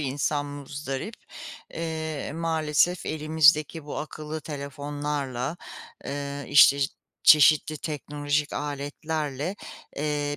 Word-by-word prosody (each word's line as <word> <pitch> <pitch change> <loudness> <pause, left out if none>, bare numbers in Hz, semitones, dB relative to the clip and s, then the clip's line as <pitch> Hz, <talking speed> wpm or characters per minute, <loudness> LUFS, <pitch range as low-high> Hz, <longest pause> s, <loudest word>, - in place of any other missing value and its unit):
insan 145 +1 -1
muzdarip. 145 +6 -5 0.6
Eee, 160 -3 -3
maalesef 160 +1 +1
elimizdeki 155 0 +3
bu 150 - -5
akıllı 155 0 -6
telefonlarla, 145 -1 -4 0.5
eee, 140 0 -4
işte, 140 -1 +7 0.4
çeşitli 155 0 +6
teknolojik 145 -1 -2
aletlerle, 145 +3 -3 0.4
eee, 145 0 -1
150 Hz, 80 wpm, -26 LUFS, 145-155 Hz, 0.6 s, işte